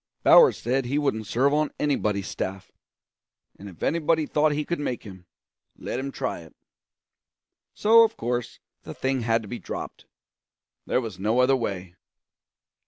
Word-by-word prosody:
Bowers 480 -3 +7
said 130 +1 -1
he 135 +4 -1
wouldn't 110 -8 -1
serve 135 +7 +2
on 150 0 +1
anybody's 105 -9 0
staff; 95 0 -5 0.9
and 100 - -9
if 90 - -12
anybody 160 -1 +1
thought 150 +1 +2
he 150 0 -2
could 170 - -3
make 130 -4 -3
him, 95 -4 -12 0.5
let 125 - -4
him 135 +1 -4
try 130 -1 -3
it. 80 -2 -15 1.2
So, 225 +2 +6
of 225 -1 +2
course, 120 0 -3 0.2
the - - -9
thing 130 -1 -1
had 115 0 +1
to - - -10
be 120 +3 -6
dropped; - - -7 0.8
there 125 - +1
was 110 -7 -7
no 110 +4 0
other 130 +1 +4
way. 95 -7 -4
125 Hz, 160 wpm, -25 LUFS, 105-150 Hz, 1.2 s, Bowers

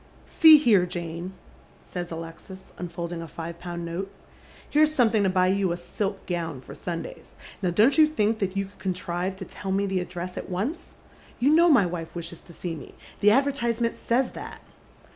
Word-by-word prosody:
" - - -26
3e« 320 -2 +8
here, 220 -11 +4
Jane," 175 0 -5 0.5
says 175 -1 -5
Alexis, 165 +3 -9
unfolding 170 -1 -5
a 165 - -7
five 165 +2 -7
pound 175 -1 -5
nota. 170 +4 -4 0.4
" - - -23
Here's 305 +1 +4
something 225 -5 +4
to 195 - +3
buy 185 0 +3
you 190 -1 +2
a 170 - -2
silk 195 +3 -4
gown 165 -6 -3
for 130 - -11
Sundays. 170 -2 -7 0.3
Now 185 - +1
don't 225 - +4
you 310 - +8
think 220 -7 0
that 195 -1 -2
you 195 - 0
could 200 +1 -18 0.2
conti 180 - -8
ive 180 +2 -1
to 190 0 -7
tell 190 +2 -6
me 200 +1 +1
the 190 -1 0
address 180 0 -5
at - - -8
once? 205 - -3 0.4
You 265 +5 +3
know 340 +2 +6
my 245 - +6
wife 170 -2 -5
wishes 170 0 -6
to - - -15
see 170 0 -4
me. 155 - -10 0.2
The 210 - +5
advertisement 235 -2 +1
says 245 +2 0
that." - - -9
190 Hz, 200 wpm, -26 LUFS, 175-225 Hz, 0.5 s, 3e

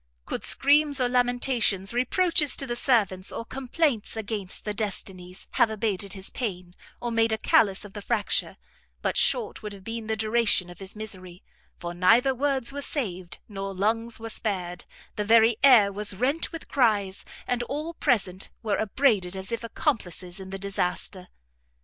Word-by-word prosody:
Could - - -4
screams 285 0 +4
or 250 - +2
lamentations, 245 -5 +1
reproaches 300 +5 +3
to 275 - 0
the 240 -2 -3
servants, 210 - +1
or 230 - -5
complaints 260 -3 -1
against 205 -3 -3
the 210 - -2
Destinies, 190 -3 -5
have 230 - +3
abated 205 -3 -2
his 195 -1 -7
pain, 180 -7 -5 0.3
or 240 - -3
made 225 0 +2
a 220 - +1
callus 205 -3 +3
of 200 - -12
the 205 - -7
fracture, 210 -1 -1 0.5
but - - 0
short 465 -2 +2
would 210 -1 -6
have 195 -1 -12
been 225 +1 -5
the 220 0 -1
duration 215 -4 +3
of 175 - -13
his 195 +1 -7
misery; 185 -4 -6 0.3
for 175 -1 -6
neither 225 +9 +4
words 270 -1 0
were 285 +1 -5
saved, 185 - -3
nor 195 -2 -5
lungs 225 +4 0
were 225 0 -6
spared, 185 -5 -3 0.3
the 210 - 0
very 225 +1 +5
air 225 -8 +7
was 205 0 -2
rent 275 - 0
with 330 - -8
cries, 205 -7 +1 0.2
and 245 -1 -1
all 300 +7 -4
present 200 - 0
were 215 -2 0
upbraided 210 -5 +1
as 190 +2 -6
if 230 0 -3
accomplices 195 - -3
in 190 0 -9
the 195 - -5
disaster. 190 -1 -3
220 Hz, 170 wpm, -26 LUFS, 195-245 Hz, 0.5 s, air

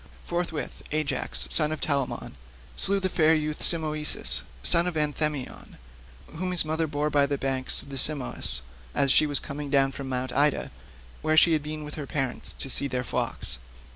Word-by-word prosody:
Forthwith 170 -3 -3
Ajax, 140 - +1
son 150 - +3
of 155 - -3
Telamon, 140 -3 -2 0.4
slew 200 0 +1
the 190 - 0
fair 160 -3 +3
youth 155 -1 -2
Simoeisius, 155 -2 +2 0.2
son 170 - +4
of 175 - -3
Anthemion, 150 -2 -2 0.6
whom 185 +2 -1
his 175 - +2
mother 160 +1 -1
bore 150 0 -1
by 145 -1 +3
the 140 0 -1
banks 130 -1 0
of - - -14
the 135 - -5
Simois, 135 - +1 0.3
as 140 -1 +3
she 155 - +6
was 145 -1 +2
coming 145 0 -6
down 135 -1 +3
from 135 0 -6
Mt. 130 0 -2
Ida, 145 +1 +2 0.5
where 155 0 +1
she 165 +1 +6
had 155 - +2
been 155 +1 -6
with 150 0 -8
her 140 - -7
parents 135 -4 -2
to - - -2
see 140 +1 +1
their 125 -2 -2
flocks. 105 - -3
150 Hz, 180 wpm, -26 LUFS, 135-155 Hz, 0.6 s, she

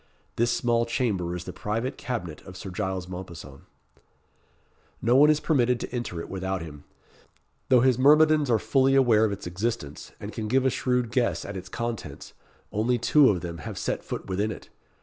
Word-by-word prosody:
This 120 +1 +2
small 120 -1 +1
chamber 100 -8 -1
is 90 - -5
the - - -7
private 115 +5 -3
cabinet 90 - -5
of 90 - -11
Sir 95 0 -7
Giles 95 -1 -3
Mompesson. 90 -6 -9 1.3
No 120 +2 +2
one 145 +3 +7
is 155 -1 +4
permitted 125 -7 +2
to - - -6
enter 120 -9 -3
it - - -6
without 95 -1 -3
him. 75 -3 -11 0.8
Though 125 -2 +6
his 130 -1 +3
myrmidons 150 +1 +5
are 115 - +4
fully 135 +4 +2
aware 115 -5 +5
of 105 - 0
its 100 - -6
existence, 90 -5 -4
and - - -7
can 110 -1 -4
give 130 +4 +2
a 130 - +3
shrewd 125 -2 0
guess 120 -1 0
at 100 - -6
its 95 0 -7
contents, 115 +2 -5 0.4
only 115 +4 +1
two 140 +4 +5
of 90 -4 0
them 85 -1 -6
have 75 - -7
set - - -2
foot - - -5
within 100 +3 -1
it. - - -10
115 Hz, 190 wpm, -26 LUFS, 95-125 Hz, 1.3 s, one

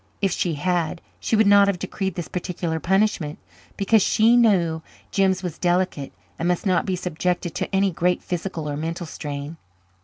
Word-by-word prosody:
If 195 -2 +1
she 175 -2 -1
had 175 +1 -1 0.2
she - - 0
would 220 0 +4
not 200 0 +6
have 200 -2 +1
decreed 190 0 -3
this 175 - -4
particular 175 -2 -3
punishment, 190 -5 +1 0.4
because 205 +2 +3
she 225 +5 +4
knew 180 -9 +3 0.3
Jims 190 -1 +2
was 175 -4 -5
delicate 175 -5 0 0.3
and 170 - 0
must 180 +2 0
not 185 -1 +2
be 190 - 0
subjected 180 0 -2
to - - -3
any 195 0 +2
great 180 +1 0
physical 175 -3 -4
or 145 - -2
mental 165 +3 -4
strain. 145 0 -6
180 Hz, 175 wpm, -23 LUFS, 165-195 Hz, 0.4 s, not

